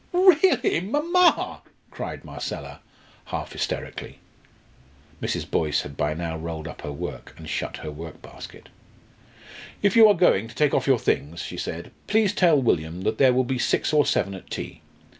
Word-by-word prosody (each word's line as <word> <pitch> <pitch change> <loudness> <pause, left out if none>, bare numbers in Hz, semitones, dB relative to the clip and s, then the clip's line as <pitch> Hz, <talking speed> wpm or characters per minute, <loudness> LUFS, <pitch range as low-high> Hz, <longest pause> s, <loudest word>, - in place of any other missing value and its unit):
"Really, 365 - +4
mamma!" 320 - +2 0.3
cried - - -6
Marcella, - - -6 0.5
half - - -5
hysterically. - - -4 1.0
Mrs. - - -2
Boyce 75 -2 +1
had 70 - -9
by 75 +2 -1
now 85 -1 -3
rolled 80 -1 -5
up - - -9
her 75 - -5
work 70 - -7
and 80 - -10
shut 70 - -3
her 75 - -6
workbasket. 80 +1 -11 1.1
"If 205 0 +3
you 225 -1 +9
are 205 - +5
going 140 - +3
to 115 - -13
take 150 -2 +2
off - - +1
your 135 -2 +5
things," 85 -4 -1
she 90 - -6
said, 85 0 -5 0.2
"please 215 -2 +3
tell 170 -7 +4
William 85 -8 0
that 110 +3 -1
there 130 -2 +6
will 130 +1 +2
be 130 0 -2
six - - +1
or 150 -1 +4
seven 100 0 +1
at 95 - -10
tea. - - -6
115 Hz, 165 wpm, -24 LUFS, -, 1.1 s, you